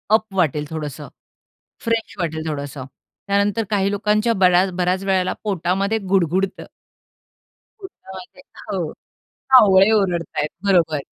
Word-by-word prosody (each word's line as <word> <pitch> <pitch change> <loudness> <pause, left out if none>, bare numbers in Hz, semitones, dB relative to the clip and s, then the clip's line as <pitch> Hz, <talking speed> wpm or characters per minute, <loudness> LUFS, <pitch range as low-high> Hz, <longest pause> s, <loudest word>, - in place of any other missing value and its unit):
Up 220 0 0
वाटेल 150 -5 +1
थोडंस. 155 -3 -6 0.8
Fresh 230 -1 -2
वाटेल 160 -2 -3
थोडसं. 140 -3 -5 0.4
त्यानंतर 200 +2 +1
काही 200 -2 +1
लोकांच्या 210 +3 +1
बऱ्याच 180 +1 +4
बऱ्याच 180 +1 0
वेळेला 190 -2 0
पोटामध्ये 195 +1 -1
गुडगुडतं 190 0 0 1.1
पोटामध्ये 190 - -12 0.3
हो. 175 -6 -3 0.6
कावळे 200 -4 +7
ओरडत 190 -6 +1
आहेत, 150 - 0 0.2
बरोबर. 170 -6 +3
190 Hz, 110 wpm, -20 LUFS, 170-205 Hz, 1.1 s, कावळे